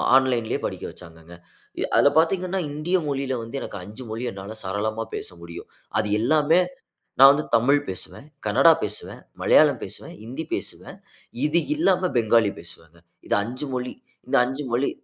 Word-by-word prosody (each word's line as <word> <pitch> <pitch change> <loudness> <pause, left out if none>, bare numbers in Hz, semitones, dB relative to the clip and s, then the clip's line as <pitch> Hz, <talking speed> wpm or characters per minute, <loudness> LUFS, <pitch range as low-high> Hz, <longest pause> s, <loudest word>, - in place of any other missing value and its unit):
ஆன்லைன்லேயே 125 -4 +2
படிக்க - - -5
வச்சாங்க. 85 0 -14 0.6
அதுல 145 - +6
பார்த்தீங்கன்னா 185 +3 +2
இந்திய 155 +5 0
மொழியில 135 -1 -2
வந்து 135 +4 -5
எனக்கு 100 - -6
5 110 +7 -10
மொழி 115 +3 -4
என்னால 100 +3 -8
சரளமா 110 +4 -2
பேச - - -4
முடியும். 85 0 -10 0.3
அது - - 0
எல்லாமே 155 +8 +3 0.6
நான் 135 +1 +10
வந்து 150 +1 -2
தமிழ் 135 +5 +4
பேசுவேன், 95 +8 -6 0.2
கன்னடா 135 +10 +6
பேசுவேன், 105 0 -4 0.2
மலையாளம் - - +5
பேசுவேன், - - -8
ஹிந்தி 130 +8 -6
பேசுவேன். - - -5 0.5
இது 160 +3 +3
இல்லாம 185 - +2
பெங்காலி 110 -2 +3
பேசுவேன். 80 +1 -12 0.3
இது - - +2
5 130 +6 -5
மொழி 125 0 -3 0.3
இந்த 135 - 0
5 135 +3 -4
மொழி. 125 +4 +1
125 Hz, 150 wpm, -24 LUFS, 105-150 Hz, 0.6 s, நான்